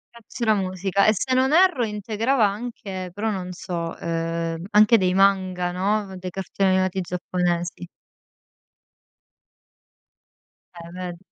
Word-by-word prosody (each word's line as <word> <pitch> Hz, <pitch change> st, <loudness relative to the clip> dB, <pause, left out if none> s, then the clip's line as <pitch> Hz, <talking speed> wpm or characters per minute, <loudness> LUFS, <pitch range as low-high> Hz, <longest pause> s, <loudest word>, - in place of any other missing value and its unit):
E -, -, -12 dB
c'era 230 Hz, -3 st, 0 dB
musica. 190 Hz, 0 st, 0 dB
E 215 Hz, -, +5 dB
se 255 Hz, +6 st, -1 dB
non 260 Hz, +1 st, +3 dB
erro 350 Hz, -7 st, +4 dB
integrava 220 Hz, +3 st, 0 dB
anche 200 Hz, -3 st, -5 dB
però 210 Hz, +3 st, -2 dB
non 185 Hz, -3 st, -4 dB
so, 170 Hz, -2 st, -5 dB
ehm, 165 Hz, 0 st, -3 dB
anche 215 Hz, +2 st, +6 dB
dei 185 Hz, -3 st, +1 dB
manga, 185 Hz, -2 st, +2 dB
no, 195 Hz, +2 st, -1 dB
dei 185 Hz, 0 st, -6 dB
cartoni 195 Hz, +1 st, -1 dB
animati 185 Hz, 0 st, +1 dB
giapponesi. 175 Hz, -1 st, -2 dB, 2.9 s
Eh 170 Hz, 0 st, -10 dB
ved 180 Hz, -1 st, -6 dB
190 Hz, 120 wpm, -23 LUFS, 180-210 Hz, 2.9 s, anche